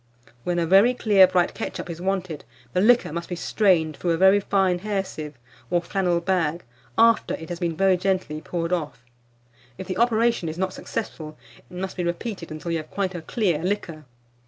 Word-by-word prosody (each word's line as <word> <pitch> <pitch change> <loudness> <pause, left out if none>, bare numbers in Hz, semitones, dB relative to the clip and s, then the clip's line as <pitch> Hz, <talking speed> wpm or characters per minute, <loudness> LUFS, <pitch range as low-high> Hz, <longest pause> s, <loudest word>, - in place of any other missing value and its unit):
When 175 -1 -1
a 170 - +1
very 195 +8 +5
clear 200 -5 +5
bright 180 -1 +1
ketchup - - -5
is 170 -1 -7
wanted, 185 -4 -2 0.3
the 180 - +2
liquor 235 -6 +4
must 170 0 -5
be 175 - -3
strained 170 -5 +2
through 175 - -3
a - - 0
very 190 +3 +6
fine 190 -2 +1
hair 200 0 -1
sieve, 150 -4 -8 0.3
or 175 - +2
flannel 175 0 0
bag, 170 -2 0 0.3
after 230 0 +4
it 160 - -10
has 175 -1 -5
been 170 -2 -1
very 190 -1 +4
gently 180 -5 -1
poured 170 +1 -3
off; 150 -8 -4 0.7
if 190 - -6
the 185 0 -4
operation 230 -6 +2
is 160 - -6
not 185 0 -1
successful, 155 -8 -6 0.2
it - - -16
must 190 +1 -5
be 180 - -1
repeated 175 +1 -4
until 155 +2 -5
you 165 - +1
have 155 -1 -7
quite 195 -2 -2
a 175 - -5
clear 180 -4 0
liquor. 175 -5 -3
180 Hz, 195 wpm, -24 LUFS, 165-195 Hz, 0.7 s, very